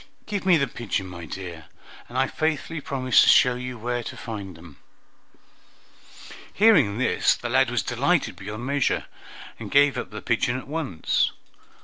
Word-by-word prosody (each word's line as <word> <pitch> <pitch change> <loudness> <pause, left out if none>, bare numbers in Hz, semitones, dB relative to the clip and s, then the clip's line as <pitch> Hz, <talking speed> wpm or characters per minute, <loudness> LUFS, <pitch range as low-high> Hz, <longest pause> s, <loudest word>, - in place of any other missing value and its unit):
Give 205 -3 -4
me 180 -3 +6
the 140 - +1
pigeon, 115 -5 -4
my 90 -2 -8
dear, 85 -2 -8 0.4
and 120 - -6
I 130 - +3
faithfully 155 +2 -2
promise 130 -3 +3
to - - +5
show 125 - +6
you 125 0 -6
where 120 +2 -2
to - - -7
find 100 -6 -7
them." 80 -3 -15 1.7
Hearing 160 - +4
this, 130 - +2
the 120 - -6
lad 130 +1 +3
was 125 -1 -1
delighted 140 - 0
beyond 105 +5 -7
measure, 140 0 0 0.5
and - - -7
gave 145 0 +4
up - - -6
the - - -8
pigeon 120 +1 0
at 130 - -9
once. 145 - -1
125 Hz, 160 wpm, -24 LUFS, 105-140 Hz, 1.7 s, me